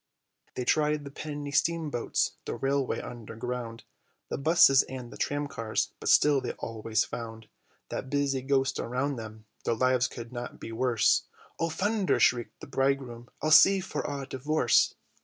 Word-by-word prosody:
They 125 - -3
tried 150 +1 +2
the 140 - -8
penny 145 -1 -6
steam 165 0 +1
boats, 120 - 0
the - - -3
railway 135 -1 0
underground, 115 0 -6 0.5
The - - -3
busses 140 -3 +6
and 125 -2 -7
the - - -10
tramcars, 140 -6 -2
but - - -2
still 145 -2 +5
they - - -4
always 110 0 -2
found 110 -1 -7 0.4
That 130 - -5
busy 140 -2 0
ghost 135 0 +1
around 130 +3 -2
them, 110 -1 -9 0.2
their 115 - 0
lives 130 +1 +2
could 120 0 -9
not 120 0 -6
be - - -7
worse. 115 -2 +2 0.3
"O 165 - 0
thunder!" 205 +4 0
shrieked 120 -3 +1
the - - -7
bridegroom, 135 -3 -1
"I'll 155 - +1
seek 195 +4 +7
for - - -3
a 140 -2 -4
divorce." 135 0 +2
130 Hz, 160 wpm, -28 LUFS, 120-145 Hz, 0.5 s, seek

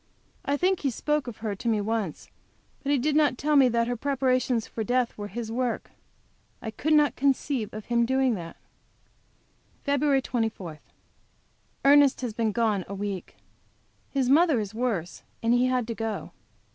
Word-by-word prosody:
I 285 - 0
think 370 +3 +2
he 280 - 0
spoke 300 +3 -1
of 235 - -6
her 210 - 0
to 215 - -6
me 220 -2 +2
once; 210 -5 -3 0.5
but 280 - -1
he 290 - +4
did 290 +4 0
not 295 -4 +3
tell 300 +2 +1
me 270 -3 +6
that 235 0 +1
her 245 - -1
preparations 255 -2 +1
for 225 - -4
death 245 +2 0
was 205 -1 -6
his 225 +2 -5
work. 245 -1 -2 0.7
I 220 - -5
could 310 +8 0
not 300 -1 +4
conceive 270 -4 0
of 215 0 -8
him 235 -1 +1
as 235 - +4
doing 265 -1 +2
that. 170 -5 -7 1.3
FEB. 280 -1 +2
24. 215 -11 -3 1.1
Ernest 285 -1 +6
has 245 -4 -3
been 225 -1 0
gone 215 -3 +1
a 200 - -6
week. 200 -2 -5 0.7
His 270 -3 0
mother 300 -1 +4
is 210 -1 -4
worse 215 -8 -2 0.2
and 230 +1 +3
he 245 +1 +3
had 255 -2 +1
to 230 - -4
go. 225 -1 -4
245 Hz, 175 wpm, -27 LUFS, 220-275 Hz, 1.3 s, me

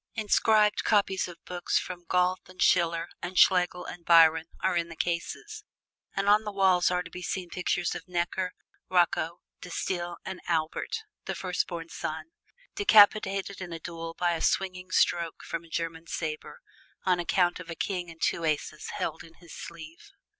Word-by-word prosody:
Inscribed 215 -1 +3
copies 200 -3 +2
of 175 -2 -12
books 180 -1 -1
from 175 -1 -4
Goethe 180 +1 +1
and 185 0 -16
Schiller 170 -2 +3
and 180 +1 -5
Schlegel 180 -1 +4
and 175 - -8
Byron 165 -1 +6
are 190 - +1
in 170 0 0
the 165 - -9
cases, 415 - -3 0.5
and 195 +1 -1
on 210 +1 +5
the 210 - -4
walls 190 -3 +4
are 180 0 0
to 170 - -12
be 180 - -7
seen 180 0 -4
pictures 180 -1 -1
of - - -8
Necker, 180 +1 -1 0.4
Rocco, 175 -2 +1 0.2
De 180 - -8
Stael 175 0 -3
and 190 -1 -6
Albert, 165 - -1 0.2
the - - -3
firstborn 175 -2 -3
son, 160 0 -5 0.4
decapitated 200 - +4
in 180 -2 -6
a 165 - -5
duel 165 0 -7
by 175 -1 +2
a 165 - -3
swinging 185 -3 0
stroke 170 -2 +1
from 165 0 -4
a 165 - -17
German 165 0 -4
saber, 155 -2 -5 0.4
on 180 -2 +3
account 175 0 +1
of 180 -1 -10
a 170 - -5
king 180 -2 -3
and 165 0 -8
two 170 - +1
aces 155 -1 -2
held 160 0 -3
in 165 0 -16
his 170 -1 -14
sleeve. 165 - -10
175 Hz, 175 wpm, -28 LUFS, 165-185 Hz, 0.5 s, Byron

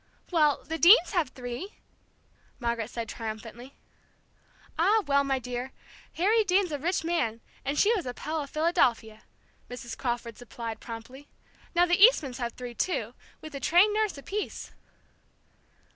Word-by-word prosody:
"Well, 305 -5 +3
the 325 +1 -5
Deanes 360 +1 +7
have 345 -9 +1
three!" 250 - -7 0.8
Margaret 235 -2 -2
said 230 -1 -5
triumphantly. 225 +4 -7 1.0
"Ah, 410 +6 +4
well, 280 -1 +3
my 270 -1 0
dear! 250 +1 -5 0.4
Harry 430 +6 +3
Deane's 375 -2 +2
a 290 - -3
rich 345 +4 -1
man, 320 -10 -1 0.2
and 280 +2 -2
she 425 +7 +4
was 370 - -2
a 250 - -3
Pell 310 +1 -3
of 280 - -7
Philadelphia," 240 -9 +1 0.5
Mrs. 240 -1 -7
Crawford 235 -2 -4
supplied 230 -2 -7
promptly. 245 +5 -10 0.5
"Now 350 +1 +5
the 350 +2 +3
Eastmans 285 - +5
have 235 -2 -3
three, 245 -1 -8
too, 235 - -2 0.3
with 310 -1 -9
a 275 - -5
trained 360 +8 +4
nurse 430 -6 0
apiece." 400 +9 -5
280 Hz, 145 wpm, -28 LUFS, 240-350 Hz, 1.0 s, Deanes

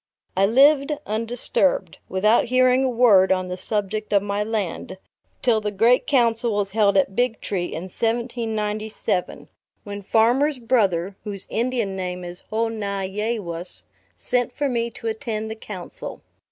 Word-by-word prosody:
I 195 +1 +4
lived 275 +5 +5
undisturbed, 235 - -1
without 210 +5 +3
hearing 255 +1 +3
a 265 - +2
word 225 -6 +5
on 185 -1 +1
the 180 - -3
subject 210 +2 -3
of 200 -1 +4
my 205 0 -1
land, 205 -4 -3 0.5
till 230 -4 +3
the 210 - -1
great 230 +5 +3
Council 235 -3 +2
was 205 -1 -1
held 205 -2 +3
at 190 0 +2
Big 245 -1 +1
Tree, 185 -3 -2
in 165 - -5
1797, 220 -2 -2 0.4
when 205 -1 -6
Farmer's 245 +8 +3
Brother, 200 -7 +1
whose 200 -3 -6
Indian 230 -4 -1
name 180 -1 -4
is 175 0 -7
Ho 225 +1 0
na 200 -3 -3
ye 210 +5 -2
wus, 170 -3 -5 0.3
sent 245 -1 0
for 290 - +1
me 235 -2 -1
to 230 - -12
attend 220 0 -3
the - - -4
council. 205 -5 -8
215 Hz, 155 wpm, -23 LUFS, 195-235 Hz, 0.5 s, lived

